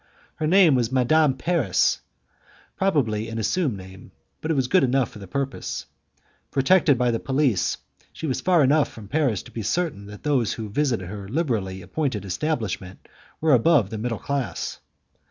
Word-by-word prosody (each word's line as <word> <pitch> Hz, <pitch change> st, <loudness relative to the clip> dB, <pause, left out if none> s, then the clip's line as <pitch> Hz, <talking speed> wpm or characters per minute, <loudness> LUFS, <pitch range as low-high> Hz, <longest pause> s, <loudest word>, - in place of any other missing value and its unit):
Her 155 Hz, -, -1 dB
name 180 Hz, -2 st, +6 dB
was 120 Hz, -2 st, +1 dB
Madame 135 Hz, +2 st, +3 dB
Paris; 130 Hz, -, +1 dB, 0.8 s
probably 115 Hz, -, 0 dB
an 115 Hz, -, -5 dB
assumed 130 Hz, -, 0 dB
name, 95 Hz, 0 st, -12 dB, 0.3 s
but 160 Hz, -, -4 dB
it 160 Hz, -, +2 dB
was 130 Hz, -3 st, +1 dB
good 185 Hz, +4 st, +4 dB
enough 130 Hz, -1 st, +1 dB
for -, -, -11 dB
the 100 Hz, -, -9 dB
purpose. 135 Hz, +5 st, -3 dB, 0.6 s
Protected 145 Hz, +1 st, +4 dB
by 125 Hz, 0 st, +2 dB
the 115 Hz, -, -1 dB
police, 135 Hz, -, +1 dB, 0.3 s
she -, -, -7 dB
was 135 Hz, -4 st, -1 dB
far 175 Hz, -4 st, +4 dB
enough 145 Hz, +2 st, +3 dB
from 110 Hz, -3 st, -11 dB
Paris 135 Hz, -, 0 dB
to -, -, -14 dB
be 115 Hz, -, -5 dB
certain 140 Hz, -, -2 dB
that 105 Hz, 0 st, -11 dB
those 135 Hz, -8 st, +1 dB
who 110 Hz, -2 st, -6 dB
visited 115 Hz, -5 st, 0 dB
her 100 Hz, +1 st, -7 dB
liberally 110 Hz, -, -2 dB
appointed 125 Hz, -, -2 dB
establishment 100 Hz, -, -3 dB, 0.3 s
were 155 Hz, -2 st, +3 dB
above 125 Hz, -, +4 dB
the 110 Hz, -, -4 dB
middle 115 Hz, 0 st, -2 dB
class. 140 Hz, +1 st, -3 dB
130 Hz, 170 wpm, -24 LUFS, 105-150 Hz, 0.8 s, name